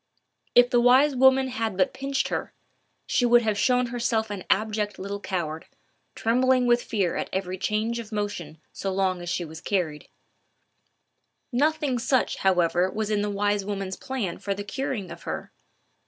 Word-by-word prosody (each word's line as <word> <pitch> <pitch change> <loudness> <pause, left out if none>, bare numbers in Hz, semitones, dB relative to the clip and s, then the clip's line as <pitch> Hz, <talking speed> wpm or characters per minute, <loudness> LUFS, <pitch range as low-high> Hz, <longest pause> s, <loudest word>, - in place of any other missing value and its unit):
If 245 +1 +6
the 240 - +4
wise 260 +4 +5
woman 265 +1 +5
had 225 -6 -2
but 185 -1 +2
pinched 275 +1 -2
her, - - -3 0.5
she 255 - +1
would 240 0 +5
have 215 -2 +1
shown 250 +4 +2
herself 235 -2 -1
an 195 -3 -5
abject 210 0 0
little 200 +1 -5
coward, 165 -6 -4 0.5
trembling 255 +2 +2
with 240 0 +4
fear 195 -8 -1
at - - -3
every 185 -1 -3
change 220 +4 -1
of 225 -1 -8
motion 205 -7 -4 0.2
so 195 - -3
long 185 -2 0
as 175 - -5
she 175 0 -1 0.2
carried 165 -7 -1
her. - - -27 1.4
Nothing 290 0 +1
such, 255 +2 +1
however, 180 -1 +2
was 215 +1 -3
in 210 -1 +1
the 210 - -1
wise 205 0 0
woman's 195 -1 -4
plan 245 -10 -4
for 200 -1 -2
the 205 - -5
curing 205 -4 -4
of 170 0 -9
her. - - -5
210 Hz, 170 wpm, -26 LUFS, 190-245 Hz, 1.4 s, If